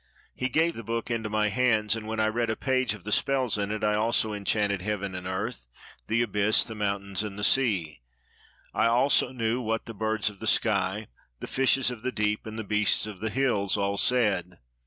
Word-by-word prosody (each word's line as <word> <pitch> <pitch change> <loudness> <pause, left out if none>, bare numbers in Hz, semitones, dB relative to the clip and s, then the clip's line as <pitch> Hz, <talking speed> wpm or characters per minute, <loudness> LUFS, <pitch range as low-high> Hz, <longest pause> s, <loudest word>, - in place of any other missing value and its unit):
He 130 - -2
gave 160 +6 +2
the 115 - -8
book 115 +2 -3
into 110 -2 -2
my 105 0 +1
hands; 110 -3 +2
and 110 -1 -7
when 110 0 -3
I 110 - +3
read 115 +2 0
a 110 - 0
page 130 -4 0
of 100 - -14
the 105 - -5
spells 130 +1 +1
in 100 0 -1
it, 110 0 -3
I 105 0 +2
also 110 0 +1
enchanted 100 -1 0
heaven 100 -1 -3
and 90 0 -6
earth, 95 - -4 0.4
the 115 +2 +2
abyss, 105 -1 +2
the 115 - -7
mountains, 100 -2 -1
and 105 -2 -5
the 105 - -4
sea; 95 - +2 0.7
I - - +2
also 125 +5 +3
knew 120 -1 -1
what 115 -1 -2
the 115 - -8
birds 110 0 -1
of 100 - -18
the 110 - -4
sky, 105 -1 +1 0.3
the - - -5
fishes 135 -1 +2
of 120 -3 -8
the 130 +2 -2
deep, 105 -1 -1
and 110 0 -7
the 110 - -3
beasts 105 0 +2
of 105 -3 -8
the 110 +2 -2
hills 105 -7 +1
all 100 0 0
said. 100 -7 +1
110 Hz, 215 wpm, -27 LUFS, 100-115 Hz, 0.7 s, I